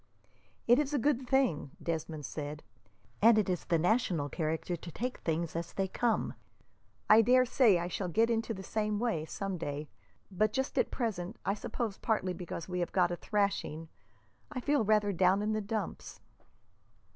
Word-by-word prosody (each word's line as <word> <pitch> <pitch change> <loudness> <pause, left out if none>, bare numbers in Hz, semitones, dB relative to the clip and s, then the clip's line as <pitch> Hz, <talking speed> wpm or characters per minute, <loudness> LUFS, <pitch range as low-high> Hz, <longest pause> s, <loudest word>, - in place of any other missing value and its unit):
"It 240 +3 +6
is 295 0 0
a - - +3
good 265 -1 +1
thing," 255 - +2
Desmond 160 -2 -3
said, 150 +1 -6 0.6
"and 225 +1 +7
it 215 - +2
is 180 -2 -2
the 170 - +2
national 175 -5 +1
character 160 +2 -2
to 170 +1 -9
take 250 - -4
things 165 0 -2
as 170 0 -4
they 195 -1 0
come. 230 +4 0 0.7
I 215 +1 +8
dare 255 +3 +5
say 235 -5 +4
I 170 0 -2
shall 180 +1 -3
get 225 +7 +3
into 225 0 0
the 190 -3 -5
same 210 +1 -1
way, 215 -9 -1
some 195 +1 -4
day, 145 0 -4 0.4
but 210 +3 +1
just 265 0 -1
at - - +2
present, 215 -4 -3
I 195 - +2
suppose 220 0 -4
partly 190 -5 0
because 170 -1 -6
we 180 -1 -3
have 175 - -1
got 180 -2 +2
a - - -1
thrashing, 190 -6 -1 0.6
I 270 - -3
feel 285 0 +2
rather 210 -1 +3
down 190 +3 +3
in 215 +1 0
the 215 - 0
dumps." 215 +1 -4
200 Hz, 180 wpm, -31 LUFS, 170-225 Hz, 0.7 s, I